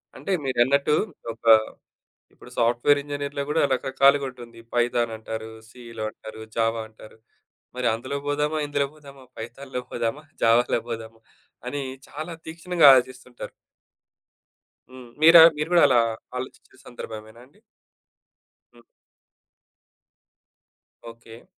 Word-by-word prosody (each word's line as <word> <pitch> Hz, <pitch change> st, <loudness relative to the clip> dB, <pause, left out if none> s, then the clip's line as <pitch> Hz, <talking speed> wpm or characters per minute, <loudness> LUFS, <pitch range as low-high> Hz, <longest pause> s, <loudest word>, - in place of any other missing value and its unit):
అంటే, 195 Hz, -, -6 dB
మీరన్నట్టు, 135 Hz, +3 st, +2 dB, 0.4 s
ఒక 115 Hz, -, -15 dB, 0.9 s
ఇప్పుడు -, -, -16 dB
సాఫ్ట్‌వేర్ 120 Hz, +5 st, +3 dB
ఇంజినీర్‌లో 145 Hz, 0 st, -4 dB
గూడా 160 Hz, -, +1 dB
రకరకాలుగా 135 Hz, +2 st, +3 dB
ఉంటుంది. 120 Hz, -2 st, -13 dB
ఇప్పుడు 115 Hz, -, -25 dB
పైథాన్ 120 Hz, -1 st, +1 dB
అంటారు, 110 Hz, 0 st, -7 dB, 0.2 s
సీలో 115 Hz, -3 st, -9 dB
అంటారు, 110 Hz, 0 st, -11 dB
జావ 115 Hz, 0 st, +1 dB
అంటారు. 110 Hz, 0 st, -16 dB, 0.6 s
మరి 125 Hz, -1 st, -1 dB
అందులో 130 Hz, +5 st, -4 dB
పోదామా? 150 Hz, +2 st, -1 dB
ఇందులో 140 Hz, -1 st, 0 dB
పోదామా? 140 Hz, -3 st, -15 dB
పైథాన్‌లో 125 Hz, +3 st, -7 dB
పోదామా? 120 Hz, +6 st, -3 dB, 0.2 s
జావాల 115 Hz, +1 st, +3 dB
పోదామా? 115 Hz, -1 st, -7 dB, 0.5 s
అని 140 Hz, +2 st, -3 dB, 0.3 s
చాలా 155 Hz, +3 st, -7 dB, 0.2 s
తీక్షణంగా 165 Hz, -1 st, +2 dB
ఆలోచిస్తుంటారు. 130 Hz, -1 st, -2 dB, 1.4 s
హ్మ్. 130 Hz, -2 st, -12 dB
మీరా 165 Hz, +1 st, +9 dB, 0.2 s
మీరు 150 Hz, +2 st, -3 dB
కూడా 170 Hz, -, +6 dB
అలా 125 Hz, -2 st, +4 dB, 0.4 s
ఆలోచించే 130 Hz, 0 st, -9 dB
సందర్భమేనండి? 115 Hz, +2 st, -11 dB, 1.1 s
హ్మ్. 120 Hz, 0 st, -21 dB, 2.3 s
ఓకే. 115 Hz, 0 st, -14 dB
125 Hz, 105 wpm, -24 LUFS, 115-140 Hz, 2.3 s, మీరా